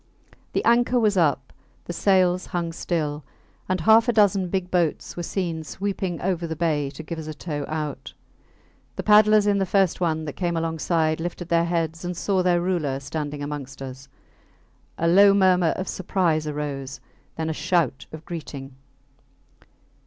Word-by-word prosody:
The - - -1
anchor 240 +1 +4
was 210 -3 +2
up, 145 -7 +1 0.3
the 175 - -5
sails 185 -1 +2
hung 170 -1 -2
still, 155 -3 -2 0.5
and 185 -2 0
half 225 +6 +5
a - - +6
dozen 200 -4 +3
big 185 -1 -2
boats 175 -4 0
were 175 - -4
seen 170 -2 -3
sweeping 190 0 -3
over 175 -2 -1
the 160 - -4
bay 150 -4 0
to 145 +3 -9
give 165 +1 -6
us 155 - -7
a 155 - -6
tow 145 -2 -4
out. 155 -2 -5 0.8
The - - -4
paddlers 215 0 +6
in 205 -1 +2
the 195 - +1
first 190 -2 +2
one 160 -2 0
that 145 - -5
came 175 -2 -2
alongside 160 -1 0
lifted 175 +1 -5
their 170 0 +3
heads 165 -1 -2
and 175 -1 -4
saw 190 0 +1
their 175 -1 +2
ruler 165 -7 -1
standing 145 0 -5
amongst 145 -2 -6
us. 135 0 -8 0.9
A 165 - 0
low 200 +3 +6
murmur 185 -3 +4
of 185 - -4
surprise 170 -5 0
arose 145 -2 -4 0.4
then 160 0 -3
a 160 - -1
shout 165 -4 0
of 155 0 -10
greeting. 140 -5 -7
170 Hz, 165 wpm, -24 LUFS, 155-185 Hz, 0.9 s, a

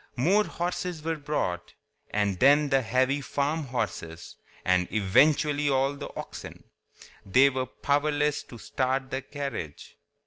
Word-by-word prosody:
More 190 +12 +3
horses 175 -2 -3
were 165 0 -1
brought, 140 -12 -3 0.3
and 100 -3 0
then 145 +2 +5
the 135 -1 +3
heavy 130 +4 +1
farm 145 +3 -1
horses, 105 -10 -5 0.3
and 90 -1 +2
eventually 145 +8 +3
all 135 +1 +2
the 140 - -7
oxen. - - -8 0.6
They 130 +8 +5
were 130 -1 -2
powerless 145 +2 0
to 120 - -11
start 130 +3 -2
the 130 - -2
carriage. 135 - -6
135 Hz, 130 wpm, -27 LUFS, 120-150 Hz, 0.6 s, then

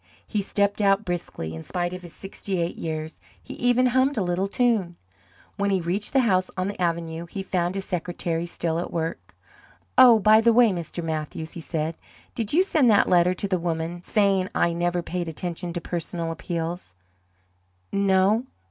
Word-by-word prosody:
He 210 - -1
stepped 200 +1 0
out 200 +1 +3
briskly, 170 - -4
in 80 - -6
spite 175 - -3
of 180 - -6
his 175 -2 -10
sixty 195 0 -4
eight 170 0 -1
years; 155 0 -5 0.2
he - - -10
even 245 +1 +2
hummed 260 +2 +2
a 205 - +1
little 180 +2 0
tune. 210 -6 +1 0.6
When 200 0 +1
he 195 -1 +2
reached 180 +5 -2
the 270 - +5
house 185 -6 +2
on 185 +1 0
the 200 -2 -5
avenue 170 -1 -2
he 195 +3 -5
found 180 -1 -1
his 195 -1 -3
secretary 175 -1 -3
still 165 -1 -1
at 175 - -4
work. 165 0 -4 0.6
"Oh, 245 -3 +9
by 215 +1 +6
the 230 0 +4
way, 235 -2 +6
Mr. 175 -1 -5
Mathews," 160 0 -4
he 170 - -7
said, 160 0 -3 0.4
"did 225 -3 -2
you 350 +5 +4
send 305 -10 +3
that 205 - +4
letter 180 0 +4
to 200 - -3
the 185 -2 0
woman, 165 0 -3
saying 195 -1 +2
I 170 - +2
never 175 +1 0
paid 175 -1 -3
attention 175 +2 -4
to 175 - -4
personal 170 0 -3
appeals? 165 - -4 1.0
No? 200 +4 +2
180 Hz, 185 wpm, -25 LUFS, 170-200 Hz, 1.0 s, Oh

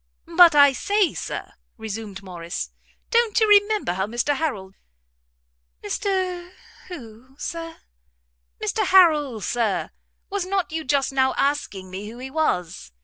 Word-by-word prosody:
"But 345 -3 +8
I 285 -1 +7
say, 405 +5 +1
Sir," - - -5 0.3
resumed 215 -3 -7
Morrice, 175 -1 -6 0.4
"don't 470 -2 +3
you 440 - +4
remember 410 - +4
how 190 +2 -2
Mr 240 +6 0
Harrel" 215 -12 -3 1.1
"Mr 370 -3 -2 0.3
who, 255 -6 -11
Sir?" 330 +2 -6 0.8
"Mr - - -1
Harrel, 300 - +4
Sir; 225 -2 -1 0.4
was 400 -1 -2
not 380 -2 -2
you 320 0 -3
just 275 -1 0
now 265 -1 +2
asking 205 -10 -1
me 200 +3 -6
who 235 - -11
he 260 +1 -8
was?" 180 - -2
280 Hz, 130 wpm, -23 LUFS, 215-360 Hz, 1.1 s, But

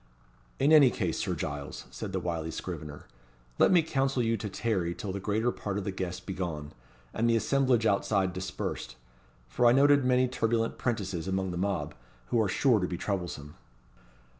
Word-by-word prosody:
"In 140 +3 +3
any 150 -5 +8
case, 90 -8 -2
Sir - - -1
Giles," 70 0 -5
said 105 - -6
the 95 - -1
wily 85 -2 -3
scrivener, 75 -4 -6 0.5
"let - - +6
me 175 -3 +5
counsel 135 -4 0
you 115 0 +1
to 110 -2 -4
tarry 95 -5 -1
till 100 - -5
the 100 - -4
greater 110 +5 0
part 100 -4 -4
of 105 - -2
the 100 - -2
guests 95 -1 -4
be 95 - -6
gone, 80 -5 -4 0.4
and 115 +1 +1
the 115 - +4
assemblage 125 +1 +2
outside 100 -2 +1
dispersed; 95 0 -5 0.5
for 65 - +2
I 120 - +6
noted 140 +1 +5
many 125 0 +3
turbulent 115 -2 -1
'prentices 95 -8 -2
among 95 -1 -1
the 90 - -4
mob, 90 -6 -1 0.4
who 115 - +2
are 105 - +1
sure 120 +2 +3
to 90 - -1
be 90 - -4
troublesome." 85 -8 -4
100 Hz, 185 wpm, -29 LUFS, 90-120 Hz, 0.5 s, any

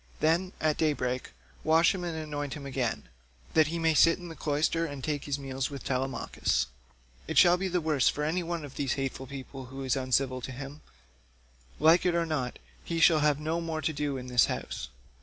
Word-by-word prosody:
Then, 170 +4 +2
at 155 -1 +1
day 155 -2 +2
break 125 -2 -3 0.3
wash 160 +2 +5
him 185 -2 -4
and 170 -2 -3
anoint 145 -3 -4
him 145 -2 -8
again, 130 -4 -2 0.5
that 155 -2 +5
he 170 +2 -2
may 165 -1 +2
sit 165 +3 +5
in 175 -1 -9
the 165 - -8
cloister 155 +3 0
and 145 -5 -5
take 145 -1 -2
his 145 -1 -1
meals 135 -1 -3
with 140 -2 -7
Telemachus. 130 - 0 0.6
It - - -3
shall 175 0 +8
be 190 +1 -2
the 180 -1 0
worse 155 -4 +3
for 150 - -2
any 165 +4 0
one 170 -2 -3
of 140 - -12
these 140 -2 0
hateful 135 -1 -3
people 135 0 -8
who 135 +2 -7
is 130 0 +1
uncivil 130 0 0
to 130 - -5
him; 135 +3 -8 1.0
like 160 +3 +6
it 180 -1 +2
or 170 -1 +2
not, 140 -6 -2 0.3
he 165 -1 -2
shall 165 -1 +6
have 150 -1 +2
no 160 +2 -1
more 160 -2 -3
to 155 - 0
do 145 -1 -2
in 125 - -6
this 125 -1 +4
house. 70 - -4
150 Hz, 215 wpm, -29 LUFS, 135-165 Hz, 1.0 s, shall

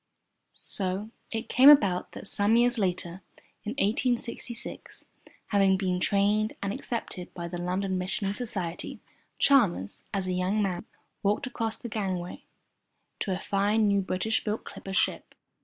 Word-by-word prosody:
So 195 +3 -1 0.2
it 225 -1 -3
came 265 +3 +7
about 200 -11 +5
that - - -8
some 205 +2 +2
years 240 0 +4
later 180 -2 -1 0.4
in 215 - -3
1866, 235 0 -2 0.4
having 195 -2 +4
been 185 -2 0
trained 205 +3 +2
and 200 0 -1
accepted 230 -8 -4
by 170 -2 -4
the 175 0 -5
London 185 +1 -1
Missionary 195 +2 -2
Society, 200 -8 -4 0.4
Chalmers, 210 - +3
as 195 -2 -1
a 185 - -1
young 185 +4 0
man, 190 -2 -1 0.4
walked 210 +6 +1
across 225 -3 -1
the - - -7
gangway 190 -5 -3 0.7
to 195 - -2
a 185 - 0
fine 205 +3 +1
new 200 -1 +3
British 190 +4 -1
built 215 0 -2
clipper 195 - -8
ship. - - 0
200 Hz, 140 wpm, -28 LUFS, 185-225 Hz, 0.7 s, came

